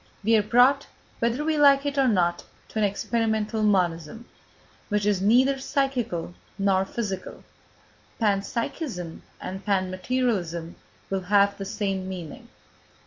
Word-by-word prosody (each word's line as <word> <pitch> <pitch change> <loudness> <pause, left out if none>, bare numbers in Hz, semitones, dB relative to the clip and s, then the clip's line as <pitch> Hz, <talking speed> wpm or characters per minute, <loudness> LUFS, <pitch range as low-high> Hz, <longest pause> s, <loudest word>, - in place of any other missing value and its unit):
We 225 +2 +4
are 215 - +5
brought, 245 +6 +4 0.3
whether 235 +6 0
we 310 -1 +1
like 280 -1 +6
it 285 0 -1
or 270 -2 +3
not, 175 -6 +1 0.3
to 220 - -3
an - - +2
experimental 220 +1 -1
monism, 185 0 0 0.6
which 210 -1 0
is 205 -3 +1
neither 255 +7 +4
psychical 255 - -1 0.2
nor 195 -1 +2
physical; 195 -3 -5 0.8
panpsychism 210 - -2 0.2
and 190 +2 -6
panmaterialism 185 -3 -1 0.4
will 195 -1 0
have 200 +1 +3
the 195 - -6
same 195 -2 -2
meaning. 175 -5 -8
210 Hz, 125 wpm, -25 LUFS, 190-240 Hz, 0.8 s, like